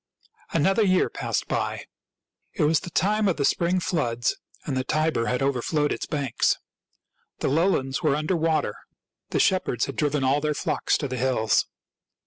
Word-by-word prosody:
Another 190 +7 +2
year 185 -3 +3
passed - - -2
by. - - -2 0.7
It 175 - +1
was 155 +1 +3
the - - -8
time 210 +5 +1
of 185 - +1
the 140 - +1
spring 175 +5 +2
floods, 120 -10 0 0.3
and 140 - -2
the 130 - 0
Tiber 155 -4 0
had 125 +2 0
overflowed 140 +3 0
its - - -3
banks. 140 -6 0 0.8
The - - -2
lowlands 140 -3 +1
were 150 -4 +2
under 155 +5 0
water. 160 -1 +1 0.6
The - - 0
shepherds 180 - +2
had - - -6
driven 150 -2 0
all 135 +3 +2
their 150 0 0
flocks - - 0
to 145 - -3
the 130 -1 -4
hills. 120 -4 +1
150 Hz, 165 wpm, -25 LUFS, 130-170 Hz, 0.8 s, year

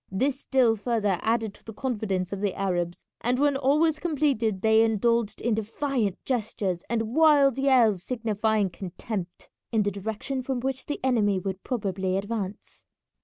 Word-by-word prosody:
This 265 +8 0
still 250 -4 +3
further 210 -4 0
added 225 -2 0
to - - -19
the 225 - -10
confidence 205 -8 -2
of 200 - -4
the 200 -3 0
Arabs, 175 -3 -2 0.2
and 245 +2 +1
when 285 +1 +2
all 275 +2 +2
was 320 -1 +2
completed 275 - 0
they 220 0 +5
indulged 225 0 +1
in 235 - +1
defiant 220 -1 -1
gestures 205 -7 -2
and 225 -1 -1
wild 285 -4 +5
yells 245 -8 +4
signifying 220 -4 0
contempt, 185 0 -6 0.2
in 220 -3 +2
the 205 - 0
direction 220 +7 -4
from 255 0 -2
which 260 +1 -3
the 295 - -3
enemy 215 -7 +2
would 190 0 -4
probably 190 -6 -2
advance. 200 -1 -5
220 Hz, 160 wpm, -26 LUFS, 200-260 Hz, 0.2 s, they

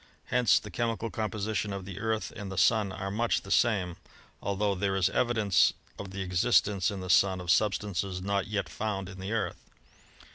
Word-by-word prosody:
Hence 125 -2 +5
the 105 - -5
chemical 115 +3 -2
composition 110 -1 -2
of 100 -1 -5
the 95 -1 -7
Earth 110 0 -2
and 100 -2 -6
the 95 - -6
Sun 100 +2 +3
are 95 0 -4
much 115 +3 0
the 95 - -9
same, 95 -8 +2 0.4
altho 100 +1 0
there 95 0 -1
is 95 -2 +2
evidence 110 -5 +3 0.3
of 100 - -6
the 95 0 -4
existence 95 +1 +2
in 100 -2 -5
the 90 - -6
Sun 95 0 +4
of 90 -1 0
substances 100 -1 0
not 100 +1 -1
yet 105 -1 -2
found 100 -3 -3
in 95 -1 -10
the 95 +3 -5
Earth. 115 -2 -2
100 Hz, 185 wpm, -29 LUFS, 95-110 Hz, 0.4 s, Hence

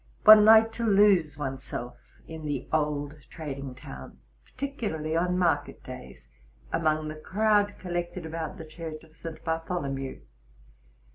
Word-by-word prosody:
One 215 -1 +10
liked 225 +1 +7
to 235 - -2
lose 195 -8 +4
one's 135 -2 -4
self 120 -1 -6 0.3
in 160 -1 -8
the 140 -3 -3
old 150 -2 0 0.2
trading 140 -4 -6
town, 65 - -10 0.3
particularly 205 - -4
on 180 +2 +1
market 175 -2 0
days, - - -10 0.5
among 155 -1 +1
the 155 0 -6
crowd 205 +1 +2
collected 175 -1 -4
about 160 +2 -5
the 165 - -8
church 155 0 -8
of 160 -1 -20
St. 165 -1 -8
Bartholomew. 160 - -3
160 Hz, 135 wpm, -28 LUFS, 150-185 Hz, 0.5 s, One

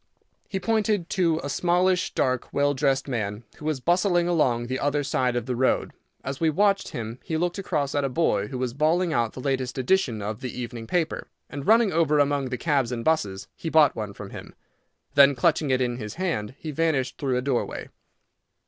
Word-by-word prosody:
He 195 - -3
pointed 210 -3 0
to 170 -5 +2
a - - -3
smallish, 180 +3 +1
dark, 130 -1 0
well 145 0 +2
dressed 135 0 +1
man 110 -4 -3
who 150 - -10
was 155 -3 -1
bustling 175 +3 +2
along 130 -9 +2
the 130 +2 -3
other 145 0 0
side 130 -3 0
of 120 - -1
the 125 -1 -2
road. 130 +2 +1 0.3
As 135 0 -4
we 165 - +3
watched 200 +5 +2
him 115 +1 -6
he 160 - -2
looked 175 +3 -1
across 150 -7 -1
at 145 - +1
a 135 - 0
boy 115 -8 +1
who 130 - -5
was 125 -2 -2
bawling 160 +5 +1
out 115 -4 0
the - - -8
latest 130 -1 -2
edition 130 - +1
of 105 +1 -4
the 125 -1 -5
evening 120 -2 -6
paper, 165 +1 -1 0.2
and 140 -1 -6
running 225 -2 +5
over 155 -2 +3
among 145 -2 +1
the 125 - -3
cabs 140 -6 +1
and 115 -2 -4
busses, 105 -12 0
he 165 - -5
bought 155 -3 +5
one 105 -2 -5
from - - -9
him. - - -10 0.6
Then, 140 0 +6
clutching 150 +3 +2
it 130 -1 +2
in 120 -1 0
his 105 -3 -6
hand, 160 - -2
he 155 - -6
vanished 150 -4 0
through 130 -3 0
a - - 0
doorway. 130 -3 -2
140 Hz, 205 wpm, -25 LUFS, 125-165 Hz, 0.6 s, Then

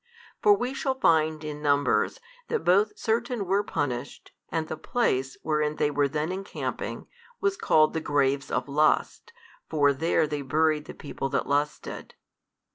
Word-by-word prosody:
For 420 - +6
we 250 -4 -2
shall 270 -1 -1
find 155 -3 +3
in 150 -1 -6
Numbers, 145 -1 +2 0.3
that 460 - -1
both 205 +3 +3
certain 230 -1 -1
were 195 +2 +2
punished, 140 -8 -4 0.2
and 160 -1 -2
the 155 - -4
place, 135 - -1
wherein 150 -1 0
they 150 - +1
were 145 0 +2
then 150 +4 -2
encamping, 195 +1 -5 0.3
was 395 0 +1
called 155 - +3
the 160 - -2
graves 140 -2 +1
of 125 0 -1
lust, 155 - +1 0.4
for 145 -3 +3
there 160 +3 +1
they 150 -1 -3
buried 155 +2 +1
the - - -9
people 135 -2 -5
that 140 - 0
lusted. 145 +1 -2
155 Hz, 155 wpm, -27 LUFS, 145-190 Hz, 0.4 s, For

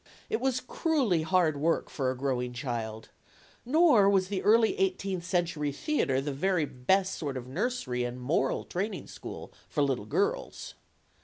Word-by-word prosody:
It 220 - 0
was 260 -1 +1
cruelly 255 - +1
hard 160 -2 +2
work 165 +4 +1
for 130 -3 -2
a 130 - -3
growing 125 -2 -1
child; 115 -3 -4 0.5
nor 275 - +5
\vas 190 -2 +2
the 195 -2 -2
early 225 - +4
eighteenth 200 - 0
century 170 -5 0
theater 145 - 0
the 140 +1 -3
very 175 +2 +1
best 190 +10 +1
sort 140 -4 -4
of 125 -1 -7
nursery 145 - -2
and 120 +1 -4
moral 130 +7 0
training 195 +1 -3
school - - -9 0.2
for 145 - +1
little 130 -7 -1
girls. - - -1
165 Hz, 155 wpm, -29 LUFS, 130-205 Hz, 0.5 s, nor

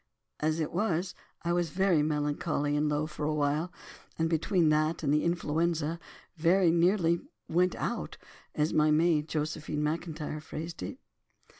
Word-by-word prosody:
As 155 +1 0
it 155 - -1
was, 180 -2 0 0.3
I 170 0 +1
was 175 -1 +1
very 185 -2 +3
melancholy 150 0 0
and 150 0 +1
low 150 +1 0
for 150 -1 -6
a 155 +1 0
while, 150 +4 0 0.5
and 165 - +1
between 165 0 +2
that 155 +2 +1
and 145 -1 +2
influenza, 165 0 0 0.4
very 170 +2 +4
nearly 170 0 +3 0.3
'went 180 +2 +2
out,' - - -3 0.4
as 150 +2 +1
my 155 0 +4
maid, 155 0 +3
Josephine 150 -1 -2
Macintyre, 155 -1 -3
phrased 165 +2 -7
it. 255 - -5
160 Hz, 145 wpm, -30 LUFS, 150-170 Hz, 0.5 s, very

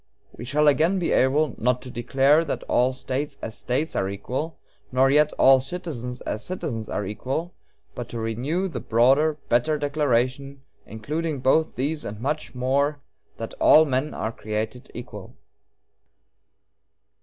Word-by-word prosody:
We 120 - -8
shall 150 +4 +2
again 160 +6 +4
be 175 - -1
able, 140 +1 +3
not 125 +2 +1
to 130 - -9
declare 135 +6 +3
that 145 - -3
'all 125 +1 +2
States 135 +3 -4
as 110 - -6
States 140 +6 -2
are 95 - 0
equal,' 130 +11 -4 0.3
nor 130 +1 +4
yet 150 +1 +5
that - - -12
'all 135 0 +6
citizens 130 -5 -6
as 110 - -4
citizens 120 -12 -4
are 105 - -2
equal,' 130 - -4 0.4
but 120 - -6
to 115 - -5
renew 130 - -1
the 175 - -5
broader, 135 +7 +3
better 125 +6 +2
declaration, 140 -2 -1 0.2
including 150 +8 -3
both 145 +5 +2
these 150 +4 -2
and 105 0 -6
much 140 -1 -3
more, 140 +4 +1 0.4
that - - -6
'all 160 - +7
men 135 +1 -1
are 110 - -2
created 110 +3 -5
equal.'" 105 -5 -9
135 Hz, 150 wpm, -24 LUFS, 120-150 Hz, 0.4 s, all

